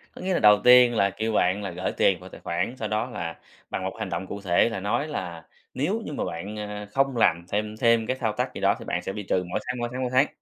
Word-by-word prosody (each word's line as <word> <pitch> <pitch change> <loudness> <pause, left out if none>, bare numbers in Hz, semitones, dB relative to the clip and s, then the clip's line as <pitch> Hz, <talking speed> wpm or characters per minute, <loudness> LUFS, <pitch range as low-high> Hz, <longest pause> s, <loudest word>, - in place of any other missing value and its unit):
có - - -9
nghĩa 185 0 -1
là - - +2
đầu 105 -1 +7
tiên 125 -1 +7
là 100 -2 +3
kêu 110 +3 -3
bạn 95 +1 +2
là 95 - -4
gởi 90 +2 -3
tiền 95 -3 +2
vào 95 +1 -11
tài - - -12
khoản, 90 +9 -2
sau 110 - -3
đó 110 +4 -1
là, 85 -7 -5 0.3
bằng - - -3
một - - -3
hành - - -3
động 95 - -3
cụ 100 - -6
thể 90 +3 +3
là 115 -4 -4
nói 120 +10 -1
là 85 - -6 0.3
nếu 185 - -1
như 150 - -5
mà - - -2
bạn, 100 +6 -5
à, 105 0 -6
không 135 -2 +1
làm 85 -6 +3
thêm 105 +1 -2
thêm 115 -1 +3
cái 130 - 0
thao 110 -4 -1
tác - - -2
gì - - -7
đó - - +3
thì - - -9
bạn 90 - -2
sẽ 95 - -4
bị 105 0 -5
trừ 90 -1 0
mỗi - - -1
tháng, 125 0 -2
mỗi 120 0 -2
tháng, 130 +1 -4
mỗi 125 -1 -2
tháng. 130 +3 +5
105 Hz, 295 wpm, -25 LUFS, 95-125 Hz, 0.3 s, đầu